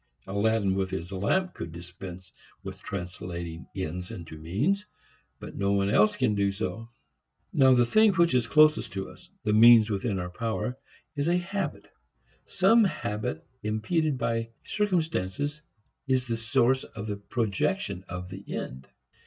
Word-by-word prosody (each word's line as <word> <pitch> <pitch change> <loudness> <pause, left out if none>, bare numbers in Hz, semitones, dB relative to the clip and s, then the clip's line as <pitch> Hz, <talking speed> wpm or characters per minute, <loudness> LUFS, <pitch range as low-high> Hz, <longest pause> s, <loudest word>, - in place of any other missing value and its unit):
Aladdin 100 0 +1
with 95 -1 -1
his 85 +1 -5
lamp 180 - 0
could 85 - -6
dispense 90 +2 -9 0.3
with - - -7
translating 85 -2 -6
ends 90 -1 -4
into 85 -2 -8
means, 130 - -1 0.5
but - - -8
no 100 0 +1
one 100 0 +1
else 210 - +4
can 110 - +1
do 100 -1 +1
so. 110 +2 -4 0.6
Now 130 -1 +6
the 120 -1 +4
thing 215 - +5
which 170 -4 +3
is 125 -3 +2
closest 155 -2 +4
to 95 -1 -4
us, - - -17
the 105 - +1
means 115 0 +8
within 100 0 -1
our 90 -1 -4
power, 115 +5 -2 0.4
is 145 +1 -1
a 175 +1 +3
habit. 190 +3 -3 0.6
Some 230 0 +5
habit 105 - -2 0.2
impeded 135 +8 0
by 115 -1 -1
circumstances 150 - -1 0.5
is 130 -1 +2
the 115 -2 -1
source 120 +3 +2
of 105 -1 -8
the 105 -2 -3
projection 110 - -1
of 90 +1 -6
the - - -8
end. 65 +1 -6
110 Hz, 150 wpm, -28 LUFS, 95-140 Hz, 0.6 s, means